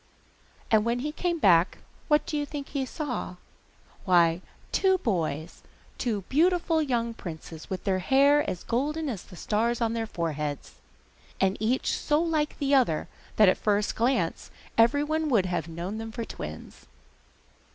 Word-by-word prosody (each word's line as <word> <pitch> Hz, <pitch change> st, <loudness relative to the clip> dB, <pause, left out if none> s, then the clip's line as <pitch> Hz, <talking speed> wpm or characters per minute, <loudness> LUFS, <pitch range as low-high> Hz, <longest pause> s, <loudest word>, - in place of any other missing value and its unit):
And 215 Hz, -1 st, +5 dB
when 235 Hz, +2 st, 0 dB
he 300 Hz, +3 st, -2 dB
came 345 Hz, +2 st, -1 dB
back, 180 Hz, -, +4 dB, 0.3 s
what 300 Hz, -1 st, +3 dB
do -, -, -4 dB
you 295 Hz, -, 0 dB
think 290 Hz, -1 st, -6 dB
he 270 Hz, -2 st, -2 dB
saw? 265 Hz, -, -4 dB, 0.7 s
Why, 170 Hz, -2 st, +4 dB, 0.3 s
two 380 Hz, -1 st, +3 dB
boys, 170 Hz, -, -2 dB, 0.4 s
two 220 Hz, -5 st, -1 dB
beautiful 330 Hz, -, +2 dB
young 235 Hz, -5 st, -1 dB
princes, 165 Hz, -5 st, -9 dB
with 190 Hz, 0 st, -5 dB
hair 270 Hz, -, +3 dB
as 180 Hz, -, -5 dB
golden 295 Hz, +6 st, -1 dB
as 210 Hz, -8 st, -4 dB
the 185 Hz, -, -14 dB
stars 225 Hz, +6 st, 0 dB
on 230 Hz, -1 st, 0 dB
their 225 Hz, -1 st, -2 dB
foreheads, 150 Hz, -6 st, -3 dB, 0.7 s
and 195 Hz, 0 st, +2 dB
each 235 Hz, +4 st, +1 dB
so 295 Hz, 0 st, +1 dB
like 315 Hz, -3 st, 0 dB
the 285 Hz, -1 st, 0 dB
other, 245 Hz, -, +2 dB, 0.3 s
that 210 Hz, -, +6 dB
at 185 Hz, -, +4 dB
the -, -, -25 dB
first 210 Hz, -1 st, +1 dB
glance 230 Hz, -8 st, 0 dB, 0.3 s
every 235 Hz, +6 st, +4 dB
one 310 Hz, +1 st, -1 dB
would 215 Hz, -8 st, +3 dB
have 175 Hz, -3 st, -2 dB
known 175 Hz, +6 st, -5 dB
them 225 Hz, 0 st, -6 dB
for 230 Hz, 0 st, -4 dB
twins. 75 Hz, -, -9 dB
230 Hz, 160 wpm, -27 LUFS, 185-290 Hz, 0.7 s, that